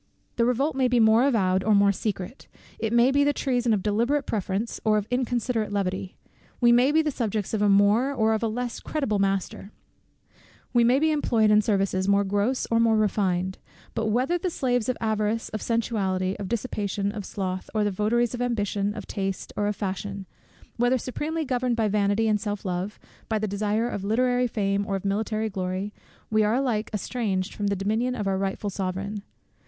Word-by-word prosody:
The 235 Hz, -, +3 dB
revolt 260 Hz, +5 st, +1 dB
may 260 Hz, -1 st, +2 dB
be 245 Hz, -1 st, +2 dB
more 225 Hz, +4 st, +5 dB
avowed 190 Hz, -7 st, +2 dB
or 215 Hz, 0 st, +3 dB
more 200 Hz, 0 st, +5 dB
secret; 200 Hz, +3 st, -4 dB, 0.3 s
it 225 Hz, -, -1 dB
may 235 Hz, +2 st, +4 dB
be 285 Hz, +1 st, +3 dB
the 290 Hz, 0 st, +2 dB
treason 245 Hz, -4 st, 0 dB
of 205 Hz, -4 st, +1 dB
deliberate 240 Hz, +7 st, +1 dB
preference, 205 Hz, +2 st, -2 dB
or 215 Hz, -1 st, +3 dB
of 205 Hz, -, -1 dB
inconsiderate 245 Hz, -3 st, -1 dB
levity; 190 Hz, -2 st, -2 dB, 0.4 s
we 240 Hz, -1 st, +5 dB
may 245 Hz, +4 st, +5 dB
be 320 Hz, +1 st, +3 dB
the 305 Hz, -, 0 dB
subjects 220 Hz, -6 st, -2 dB
of 215 Hz, -, 0 dB
a 205 Hz, -, +4 dB
more 205 Hz, +7 st, +4 dB
or 220 Hz, -5 st, +2 dB
of 220 Hz, -, -1 dB
a 230 Hz, -, +1 dB
less 240 Hz, +2 st, -3 dB
creditable 275 Hz, -10 st, -1 dB
master; 195 Hz, 0 st, -1 dB, 1.0 s
we 240 Hz, -1 st, +5 dB
may 245 Hz, +3 st, +4 dB
be 315 Hz, +2 st, +2 dB
employed 230 Hz, -8 st, +2 dB
in 210 Hz, 0 st, +6 dB
services 195 Hz, -2 st, 0 dB
more 200 Hz, 0 st, +4 dB
gross 205 Hz, +6 st, 0 dB
or 230 Hz, -, +3 dB
more 225 Hz, -1 st, +4 dB
refined: 190 Hz, -3 st, 0 dB, 0.3 s
but 225 Hz, 0 st, -1 dB
whether 255 Hz, +11 st, +1 dB
the 365 Hz, -, -1 dB
slaves 245 Hz, -7 st, 0 dB
of 255 Hz, -, 0 dB
avarice, 220 Hz, 0 st, -1 dB
of 215 Hz, -, -5 dB
sensuality, 195 Hz, -5 st, -1 dB
of 200 Hz, -, -4 dB
dissipation, 205 Hz, -4 st, -2 dB
of 205 Hz, -1 st, -6 dB
sloth, 185 Hz, -1 st, -4 dB
or 215 Hz, -, +2 dB
the 205 Hz, -, +1 dB
votaries 225 Hz, +5 st, +1 dB
of 245 Hz, -, -4 dB
ambition, 205 Hz, -4 st, -1 dB
of 215 Hz, -, -6 dB
taste, 195 Hz, -1 st, -4 dB
or 205 Hz, -, 0 dB
of 210 Hz, -, -1 dB
fashion; 195 Hz, 0 st, -4 dB, 0.5 s
whether 245 Hz, +2 st, +3 dB
supremely 305 Hz, +6 st, -3 dB
governed 250 Hz, -2 st, 0 dB
by 225 Hz, -2 st, +1 dB
vanity 205 Hz, +1 st, +1 dB
and 210 Hz, -2 st, +1 dB
self 205 Hz, -2 st, -4 dB
love, 185 Hz, +2 st, -3 dB, 0.3 s
by 220 Hz, -, +1 dB
the 215 Hz, 0 st, -1 dB
desire 210 Hz, +3 st, 0 dB
of 200 Hz, -5 st, -4 dB
literary 245 Hz, +4 st, +2 dB
fame 200 Hz, -3 st, 0 dB
or 195 Hz, -, -1 dB
of 195 Hz, -, -5 dB
military 215 Hz, +2 st, -1 dB
glory, 190 Hz, 0 st, -3 dB, 0.4 s
we 215 Hz, 0 st, +3 dB
are 210 Hz, +2 st, +2 dB
alike 245 Hz, -5 st, 0 dB
estranged 205 Hz, -3 st, -2 dB
from 205 Hz, -, -2 dB
the 200 Hz, -, +1 dB
dominion 220 Hz, +6 st, 0 dB
of 210 Hz, -4 st, -3 dB
our 190 Hz, -1 st, 0 dB
rightful 195 Hz, +1 st, -2 dB
sovereign. 195 Hz, +2 st, -3 dB
215 Hz, 195 wpm, -25 LUFS, 200-240 Hz, 1.0 s, in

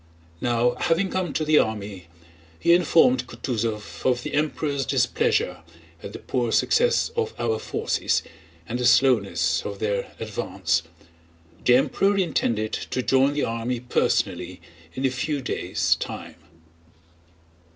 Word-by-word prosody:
Now 120 Hz, 0 st, +2 dB
having 180 Hz, +3 st, +1 dB
come 185 Hz, -4 st, -1 dB
to 155 Hz, -, -1 dB
the 150 Hz, 0 st, +5 dB
army, 100 Hz, -5 st, -3 dB, 0.5 s
he 170 Hz, -, +4 dB
informed 180 Hz, +8 st, +4 dB
Kutúzov 105 Hz, -8 st, -4 dB
of 125 Hz, -1 st, +1 dB
the -, -, -5 dB
Emperor's 145 Hz, -1 st, -1 dB
displeasure 90 Hz, -6 st, +1 dB, 0.4 s
at 100 Hz, -, -8 dB
the -, -, -7 dB
poor 120 Hz, -3 st, -2 dB
success 475 Hz, -, +2 dB
of 455 Hz, -1 st, -2 dB
our 110 Hz, -2 st, -1 dB
forces -, -, -1 dB, 0.4 s
and 120 Hz, -, -3 dB
the 125 Hz, -, +2 dB
slowness 105 Hz, -, +3 dB
of 100 Hz, -1 st, -5 dB
their 100 Hz, -1 st, -2 dB
advance. 95 Hz, -5 st, -1 dB, 0.8 s
The 125 Hz, -, +5 dB
Emperor 155 Hz, +10 st, +2 dB
intended 115 Hz, -, 0 dB
to 130 Hz, -, -3 dB
join 135 Hz, +2 st, +3 dB
the 145 Hz, -, -1 dB
army 115 Hz, +2 st, -2 dB
personally 125 Hz, +1 st, -1 dB, 0.4 s
in 130 Hz, -, -2 dB
a 130 Hz, -, +2 dB
few 145 Hz, +3 st, -2 dB
days' 125 Hz, -, 0 dB
time. -, -, -6 dB
125 Hz, 130 wpm, -24 LUFS, 110-150 Hz, 0.8 s, the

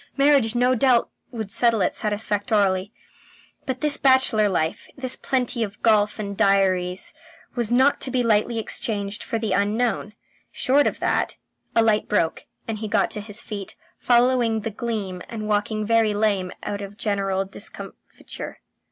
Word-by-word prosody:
Marriage 275 Hz, -5 st, +4 dB
no 250 Hz, +1 st, +3 dB
doubt 250 Hz, -1 st, +3 dB, 0.2 s
would 220 Hz, -5 st, -6 dB
settle 230 Hz, 0 st, +2 dB
it 180 Hz, -, +1 dB
satisfactorily, 205 Hz, -2 st, 0 dB, 0.8 s
but 260 Hz, -1 st, -3 dB
this 300 Hz, -1 st, +1 dB
bachelor 260 Hz, -6 st, +4 dB
life, 160 Hz, -4 st, -1 dB
with 260 Hz, -2 st, 0 dB
plenty 250 Hz, -2 st, -1 dB
of 210 Hz, -2 st, -3 dB
golf 210 Hz, -2 st, +3 dB
and 200 Hz, -2 st, -4 dB
diaries, 190 Hz, -3 st, +1 dB, 0.4 s
was 240 Hz, -2 st, -1 dB
not 260 Hz, +4 st, +3 dB
to -, -, 0 dB
be 255 Hz, -1 st, +1 dB
lightly 230 Hz, +1 st, +2 dB
exchanged 210 Hz, -2 st, -2 dB
for 230 Hz, -, -3 dB
the 220 Hz, -3 st, -1 dB
unknown. 210 Hz, +1 st, 0 dB, 0.4 s
Short 280 Hz, +3 st, +2 dB
of -, -, -2 dB
that... -, -, 0 dB, 0.4 s
A 230 Hz, -, +5 dB
light 215 Hz, -1 st, +2 dB
broke, 165 Hz, -6 st, 0 dB, 0.2 s
and 220 Hz, -2 st, -3 dB
he 215 Hz, -, -4 dB
got 210 Hz, +1 st, +1 dB
to 210 Hz, -, -3 dB
his 210 Hz, +2 st, -6 dB
feet, 200 Hz, -3 st, -7 dB, 0.2 s
following 240 Hz, -2 st, +3 dB
the 225 Hz, +1 st, -4 dB
gleam 205 Hz, -5 st, -4 dB
and 215 Hz, -2 st, -5 dB
walking 210 Hz, +1 st, 0 dB
very 225 Hz, -1 st, +2 dB
lame 200 Hz, -4 st, +1 dB
out 205 Hz, 0 st, -4 dB
of 200 Hz, +1 st, -8 dB
general 195 Hz, -3 st, -1 dB
discomfiture. 195 Hz, -, -9 dB
215 Hz, 155 wpm, -23 LUFS, 200-240 Hz, 0.8 s, A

